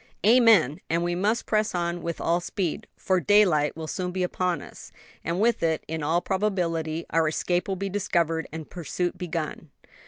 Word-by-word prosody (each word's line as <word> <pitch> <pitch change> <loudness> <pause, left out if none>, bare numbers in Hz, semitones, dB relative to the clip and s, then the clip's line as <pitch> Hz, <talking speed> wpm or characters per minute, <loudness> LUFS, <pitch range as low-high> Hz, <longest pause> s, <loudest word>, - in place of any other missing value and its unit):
"Amen! 220 - +5
and 165 +1 +1
we 175 0 0
must 205 +6 0
press 215 -2 0
on 170 0 -1
with 170 0 -4
all 170 +1 +1
speed; 175 -1 -3
for 185 -1 +1
daylight 170 -5 +3
will 160 - -5
soon 180 +3 -3
be 185 0 -1
upon 180 -1 -1
us, - - -12 0.3
and 170 +3 -2
with 235 +3 +2
it, 160 -1 0
in 160 0 -4
all 160 +4 +1
probability, 170 -5 -1
our 165 -1 +3
escape 175 +3 0
will 195 - -1
be 195 +1 -3
discovered 170 -5 0
and 160 0 -7
pursuit 175 +1 -3
begun." 165 -3 -4
175 Hz, 180 wpm, -26 LUFS, 165-190 Hz, 0.3 s, Amen